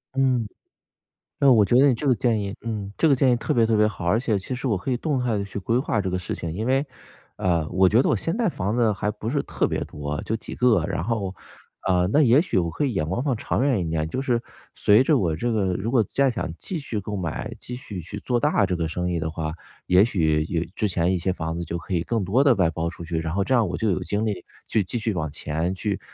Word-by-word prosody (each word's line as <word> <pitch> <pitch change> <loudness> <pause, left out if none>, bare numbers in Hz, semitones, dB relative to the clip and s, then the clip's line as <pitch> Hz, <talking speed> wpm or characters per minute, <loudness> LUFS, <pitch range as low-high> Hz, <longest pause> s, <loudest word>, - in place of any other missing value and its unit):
嗯。 130 -5 +2 0.9
呃， 140 -1 +6
我 110 - +6
觉 120 - +2
得 140 - +7
你 130 - +4
这 140 +5 -3
个 130 - +4
建 115 -3 +1
议 100 +1 -4
嗯， 105 -4 -4
这 165 - +3
个 140 - +5
建 130 0 +3
议 - - +4
特 120 - -1
别 115 - +4
特 110 0 +2
别 105 - +5
好， 90 -4 -6
而 105 +6 +3
且 110 -5 0
其 125 +7 -5
实 130 - -3
我 110 - +2
可 95 +8 -4
以 125 - +1
动 145 -2 -1
态 115 -4 0
地 100 - -2
去 100 +1 -6
规 115 +5 0
划 115 -5 0
这 95 - -2
个 90 - -1
事 90 - -4
情。 85 - -4
因 105 +7 -3
为， 135 +3 +2 0.5
呃， 85 -4 0
我 95 +1 +4
觉 110 +6 +4
得 - - +1
我 - - +3
现 165 +4 -2
在 225 -5 +1
房 100 - -2
子 115 -3 +3
还 105 +1 -1
不 105 +2 -5
是 145 +1 0
特 - - -1
别 - - -2
多， 75 0 -5
就 110 - -2
几 - - -7
个， 115 -9 +3
然 80 - -2
后 100 -3 -2 0.5
呃， 90 -1 +3
那 150 +3 +5
也 130 +5 +5
许 175 - -1
我 85 -2 +1
可 90 - -2
以 135 - +1
眼 80 -7 -1
光 115 +9 -1
放 130 -6 0
长 125 - -1
远 135 -7 +2
一 85 - -2
点， 80 -1 -1
就 130 - -3
是 120 -3 0 0.3
随 105 +5 +4
着 155 - +3
我 85 - +1
这 120 +9 -1
个 95 -5 0
如 110 +6 -2
果 120 -5 +4
再 135 +4 +1
想 115 - -3
继 175 -4 -4
续 115 -7 -4
购 105 +1 -5
买， 90 -5 -4
继 125 - -7
续 105 -7 -7
去 100 +5 -7
做 125 -1 0
大 135 -6 +2
这 90 -1 -1
个 85 -2 -1
生 90 +2 -3
意 85 -2 -1
的 80 0 -2
话， 80 -1 -4 0.3
也 90 +2 +5
许 80 -9 +2
也 85 -2 -1
之 105 - 0
前 90 0 +1
一 90 - 0
些 95 +2 0
房 80 -2 -3
子 85 - -3
就 85 +1 -4
可 85 +3 -6
以 85 - +1
更 110 +2 -1
多 120 +9 +3
地 140 - +5
外 90 -3 +3
包 80 +1 -2
出 85 0 -9
去。 80 -1 -2
然 80 0 -3
后 100 +3 +1
这 130 - 0
样， 115 -6 +3
我 85 - -3
就 110 -3 +1
有 95 - -1
精 105 +4 -1
力 100 -5 -2 0.2
去 105 - +1
继 105 +7 -4
续 115 -1 -1
往 80 -4 -2
前， 80 +4 -2
去 100 +1 -2
105 Hz, 305 characters per minute, -24 LUFS, 90-120 Hz, 0.9 s, 得